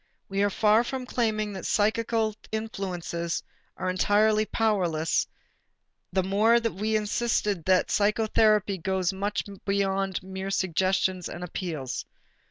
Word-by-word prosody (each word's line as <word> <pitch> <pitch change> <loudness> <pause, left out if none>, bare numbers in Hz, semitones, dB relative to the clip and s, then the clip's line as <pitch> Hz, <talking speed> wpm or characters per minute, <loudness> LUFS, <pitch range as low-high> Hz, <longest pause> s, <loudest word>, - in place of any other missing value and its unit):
We 195 0 0
are 205 - +3
far 215 +3 +4
from 255 +1 -4
claiming 215 -4 -1
that 190 - -6
psychical 220 +1 +1 0.2
influences 185 -6 -3 0.3
are 185 - -3
entirely 210 +3 +3
powerless, 175 -8 +1 0.8
the 190 0 +1
more 205 +5 +3
as 235 - +3
we 215 +2 -2
insisted 210 -3 0
that 185 -1 +3
psychotherapy 210 -1 +2
goes 190 +1 0
much 200 +2 -2 0.2
beyond 195 -1 0
mere 190 +1 -5
suggestions 185 -1 0
and 175 - -7
appeals. 160 -7 -4
200 Hz, 120 wpm, -27 LUFS, 185-215 Hz, 0.8 s, far